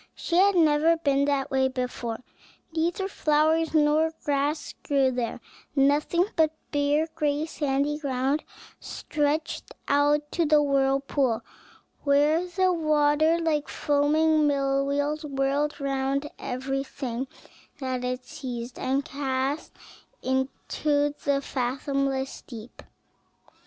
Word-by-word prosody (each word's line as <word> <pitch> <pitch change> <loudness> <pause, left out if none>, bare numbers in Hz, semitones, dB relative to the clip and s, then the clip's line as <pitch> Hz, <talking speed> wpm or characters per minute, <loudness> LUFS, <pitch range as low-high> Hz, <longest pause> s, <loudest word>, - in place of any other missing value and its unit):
She 340 - -3
had 395 +1 +5
never 320 0 +4
been 280 -3 +2
that 280 -2 0
way 265 -1 +3
before: 250 -3 -4 0.5
neither 340 +4 0
flowers 320 -2 +2
nor 310 +1 +3
grass 290 +2 -1
grew 275 -2 +2
there; 245 -1 -3 0.4
nothing 295 +5 +3
but 315 -1 +2 0.2
bare, 290 +2 +2
gray, 295 0 0
sandy 290 -1 -1
ground 275 +1 0 0.4
stretched 305 +1 -2 0.2
out 290 +1 +2
to 335 -2 +1
the 300 0 +5
whirlpool, 275 -4 +1 0.6
where 295 +4 +3
the 370 +1 +2
water, 310 0 +3
like 320 -3 0
foaming 305 +1 +2
mill 275 -1 +1
wheels, 285 +2 -1
whirled 280 +1 -1
round 275 +1 -1
everything 265 -1 -3 0.5
that 260 -2 -3
it 250 0 -3
seized, 245 -2 -6
and 270 +2 0
cast 275 +1 -2 0.5
it - - -7
into 285 +2 0
the 280 -1 +2
fathomless 270 +1 -2
deep. 235 -1 -10
285 Hz, 110 wpm, -26 LUFS, 270-305 Hz, 0.6 s, had